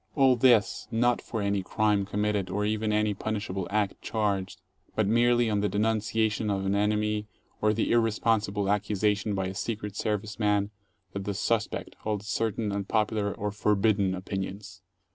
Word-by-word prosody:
All 135 -3 +5
this, 120 -3 +3
not 120 +1 +2
for 110 -3 -4
any 100 -1 +1
crime 105 +1 +1
committed 105 -1 -1
or 105 +3 -1
even 110 0 0
any 105 0 +2
punishable 100 -3 -3
act 105 -1 -1
charged, 100 -3 -1 0.4
but 110 - +2
merely 120 +2 +3
on 105 -2 +1
the 105 0 +1
denunciation 110 +1 0
of 95 -1 -1
an 95 - +1
enemy 105 +1 0 0.3
or 105 - +4
the 110 +1 0
irresponsible 110 -3 +1
17 100 +1 +2
accusation 105 0 0
by 95 -1 -1
a 95 - -4
Secret 105 0 -4
Service 105 0 -2
man 105 -1 +1 0.4
that 100 -1 -4
the 100 - -2
"suspect" 110 +2 -1
holds 105 -1 -3
cer 110 +1 0
tain 105 0 -3
unpopular 105 +1 0
or 105 +1 -3
"forbidden" 100 -2 +2
opinions. 95 0 -6
105 Hz, 160 wpm, -28 LUFS, 100-110 Hz, 0.4 s, All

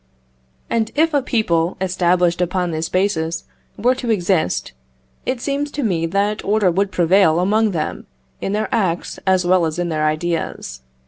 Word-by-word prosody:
And 225 -1 0
if 320 +2 +2
a 285 - +3
people 180 -9 0
established 180 -1 +1
upon 180 0 0
this 160 0 -3
basis 170 -4 0 0.3
were 245 +5 +3
to 255 -2 -5
exist, 180 - 0 0.6
it 255 -1 -1
seems 285 +2 -1
to 290 - -2
me 170 -7 0
that 200 +4 0
order 205 -2 +2
would 195 +3 0
prevail 175 -1 +4
among 215 +4 +2
them 160 -6 -3 0.3
in 195 - -2
their 215 +1 0
acts 185 -7 -1
as 185 -1 +3
well 180 0 +4
as 160 0 -1
in 175 -1 -1
their 155 -1 0
ideas. 155 - -3
185 Hz, 165 wpm, -20 LUFS, 170-215 Hz, 0.6 s, prevail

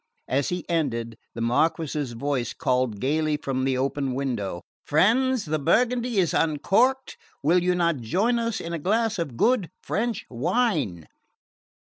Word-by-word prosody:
As 135 +1 0
he 180 -1 -4
ended 115 -9 -1 0.2
the 115 - -4
Marquess's 145 +2 0
voice 125 -1 -2
called 125 -5 0
gaily 150 +4 +1
through 135 -3 -2
the 135 -1 +1
open 135 0 -1
window: 120 -10 -3 0.2
"Friends, 235 - +2
the 155 0 -1
burgundy 240 - +1
is 180 -4 +2
uncorked! 200 - +1 0.3
Will 175 +5 +4
you 180 0 +1
not 170 -3 +1
join 195 - +1
us 230 -2 -1
in 170 - -5
a 165 - -2
glass 220 +5 0
of 140 -8 -4
good 230 - +2
French 230 +1 -2
wine?" 145 - 0
155 Hz, 145 wpm, -25 LUFS, 130-210 Hz, 0.3 s, Will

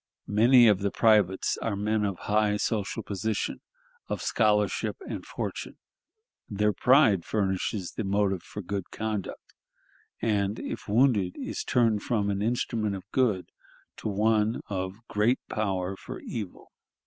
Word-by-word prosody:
Many 120 +4 +6
of 105 -3 +4
the 100 0 0
privates 105 -4 +3
are 115 -3 -2
men 105 +1 0
of 100 -3 -2
high 105 0 +2
social 105 +1 -2
position, 105 +2 -2 0.5
of - - -3
scholarship 105 -2 +1
and - - -5
fortune. - - -5 0.7
Their 105 +1 +1
pride 120 - +4
furnishes 95 -1 -1
the 110 - -4
motive 100 -2 +1
for 105 - -8
good 100 0 -4
conduct, 105 -3 -5 0.7
and, 105 -1 0
if - - -6
wounded, 105 -5 +3
is - - -4
turned 115 -4 +2
from 100 -3 0
an 100 0 -2
instrument 110 -2 -1
of 95 - -10
good 110 -9 +1 0.5
to - - -5
one 110 +2 +1
of 95 +3 -5
great 110 +5 +2
power 95 -3 -1
for - - -8
evil...." 105 -6 -7
105 Hz, 135 wpm, -27 LUFS, 100-110 Hz, 0.7 s, Many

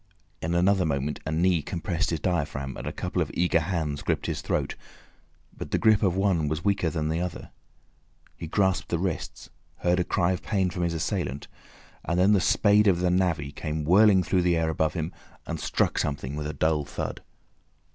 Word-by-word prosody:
In 85 +2 -1
another 95 +2 +3
moment 75 -2 -1
a - - -1
knee 85 +1 +2
compressed 85 +4 -2
his 80 - -1
diaphragm, 70 -6 -2
and - - -7
a - - -2
couple - - -2
of - - -1
eager 90 -1 +2
hands 80 -4 -2
gripped - - -1
his - - -3
throat, - - -1 0.8
but - - -7
the - - +1
grip 110 -2 +4
of 95 -3 +2
one 95 -5 +1
was 80 +4 -3
weaker 100 -4 +2
than 75 0 -2
the 80 +2 -1
other; 90 -2 -5 0.8
he 85 - -7
grasped 95 +2 +1
the 85 - 0
wrists, 90 -1 -4 0.3
heard 90 +1 +2
a - - +2
cry 85 +1 +1
of 90 - -2
pain 95 -4 0
from 90 - -4
his 85 -1 0
assailant, 70 -3 -3 0.6
and 85 +1 -1
then 95 +3 +5
the 100 - +3
spade 105 +2 +4
of 90 -3 +4
the 90 0 +1
navvy 85 -6 0
came 75 0 -4
whirling 95 +3 +5
through 90 +2 +1
the 90 -1 +2
air 80 0 +1
above 80 0 0
him, 80 -1 -3 0.3
and - - -4
struck - - 0
something 70 -2 -2
with 75 0 -3
a 75 - -4
dull 75 +1 +1
thud. - - -5
85 Hz, 200 wpm, -26 LUFS, 80-95 Hz, 0.8 s, then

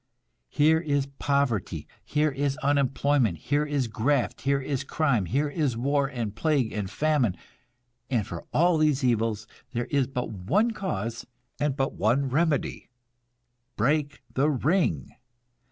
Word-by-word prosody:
Here 155 - +4
is 145 -4 0
poverty, 140 -8 0 0.2
here 150 0 +1
is 140 +1 -1
unemployment, 140 - +2
here 145 - 0
is 145 -3 0
graft, 125 +5 0
here 140 +2 +1
is 135 -1 -2
crime, 140 -11 +1
here 140 - 0
is 145 -5 -1
war 140 +3 +1
and 115 -6 -4
plague 140 -2 +1
and 100 -3 -3
famine; 130 - +1 0.7
and 120 -6 +1
for 85 - -7
all 170 0 +3
these 150 -3 +2
evils 115 -3 +1 0.3
there 120 0 -1
is 140 -3 +2
but 125 -2 -4
one 155 - +1
cause, 115 - -4 0.3
and 145 -2 0
but 135 -1 -1
one 125 +7 +1
remedy. 150 +1 0 0.9
Break 145 +5 0
the 140 +3 +2
ring! 145 - 0
140 Hz, 135 wpm, -27 LUFS, 115-150 Hz, 0.9 s, Here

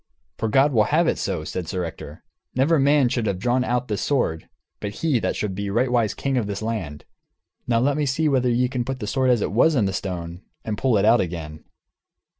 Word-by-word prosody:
"For 110 - -1
God 135 +5 +3
will 110 -3 +4
have 165 +3 +2
it - - 0
so," - - -2
said 90 -3 -5
Ector; 90 -3 -6 0.3
"never 145 +5 +3
man 140 -1 +4
should 120 -3 -1
have 100 -2 -1
drawn 125 +6 +1
out 125 0 -1
this 105 -3 -2
sword 100 - -1 0.3
but 105 - -4
he 155 -7 +1
that - - -1
shall 105 - -2
be 100 +1 -4
rightwise 120 0 +1
king 135 -1 -1
of 115 -4 0
this 100 +1 -4
land. 95 -11 -4 0.6
Now 115 - +2
let 140 +2 +2
me 150 -1 0
see 155 +4 +1
whether 130 -3 +2
ye 125 +1 +2
can 125 -1 -2
put 130 +2 -4
the 105 - -4
sword 130 +4 +1
as 120 -3 +3
it - - -2
was 150 +9 +3
in 115 -6 +2
the 95 - -1
stone, 90 -2 -5 0.2
and 110 - -2
pull 125 -1 +2
it 100 - +2
out 115 +2 +5
again." 80 -3 -6
120 Hz, 225 wpm, -23 LUFS, 100-130 Hz, 0.6 s, out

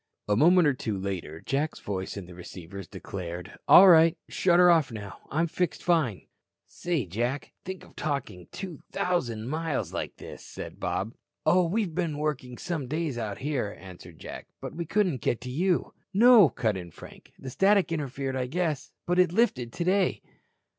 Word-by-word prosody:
A 105 - +2
moment 170 - +5
or 145 - +3
two 110 -5 -3
later, 95 -5 -5
Jack's 145 +4 -1
voice 95 0 -4
in 100 - -6
the 90 - -12
receivers 90 +1 -9
declared: 90 -2 -7
"All 195 - +10
right. 165 -2 +7
Shut 175 -2 +2
her 180 0 +7
off 160 -6 +3
now. 105 -3 -8
I'm 160 +4 +1
fixed 175 +2 -2
fine." 155 - +1 0.4
"Say, 170 - -2
Jack, 120 +9 -3
think 190 0 -6
of - - -20
talking 120 - -4
2,000 165 - -3
miles 155 0 -2
like - - -4
this," - - -10
said - - -9
Bob. 110 +5 -2 0.3
"Oh, 175 +2 +4
we've 195 -1 -1
been 165 -3 -1
working 140 -5 -3
some 160 -7 -3
days 150 -3 -2
out 105 -3 -4
here," 130 -8 -2
answered 90 -3 -12
Jack. - - -9
"But - - -7
we 170 +1 -5
couldn't 185 - +1
get 120 +1 -1
you." 170 +8 0 0.2
"No," 225 - +8
cut 110 -5 -1
in 90 -2 -7
Frank. - - -14
"The 130 - -8
static 195 +2 +3
interfered, 135 -3 -3
I 130 -1 -1
guess. 155 -1 -2
But 180 +1 +1
it 180 -2 +4
lifted 175 - +1
today." 185 +4 +1
145 Hz, 170 wpm, -27 LUFS, 110-175 Hz, 0.4 s, All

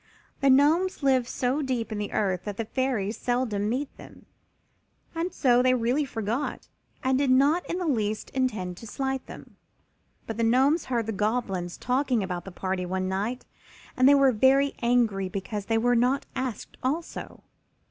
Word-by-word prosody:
The 275 - +3
Gnomes 305 +6 +3
live 260 -3 +3
so 260 +4 -1
deep 250 -5 -2
in 210 - -3
the 205 - -4
earth 185 -4 -1
that 205 -2 -5
the 230 - -2
Fairies 230 -4 -1
seldom 230 -5 -1
meet 270 +4 -3
them, - - -14 0.9
and 335 +2 -2
so 250 -5 +3
they 255 0 +4
really 250 +5 +1
forgot 235 +2 -3 0.4
and 260 0 +2
did 280 -2 +1
not 280 +7 +4
in 345 - -1
the 365 - -2
least 215 -8 -1
intend 210 -9 -2
to 230 - -10
slight 265 +2 -2
them. - - -12 0.7
But 225 - -5
the 230 - 0
Gnomes 265 +8 +3
heard 240 -3 -1
the 225 - -2
Goblins 200 -4 -2
talking 250 -3 0
about 180 -2 -4
the 195 - -8
party 185 0 -3
one 185 +1 -2
night 205 +7 -2 0.5
and 255 +1 +5
they 285 - +7
were 275 -1 +5
very 270 +4 +3
angry 230 -6 +2
because 200 +2 -4
they 225 - +2
were 245 +2 +2
not 250 +4 +2
asked 255 -4 -4
also. 305 +6 -4
245 Hz, 175 wpm, -26 LUFS, 210-270 Hz, 0.9 s, they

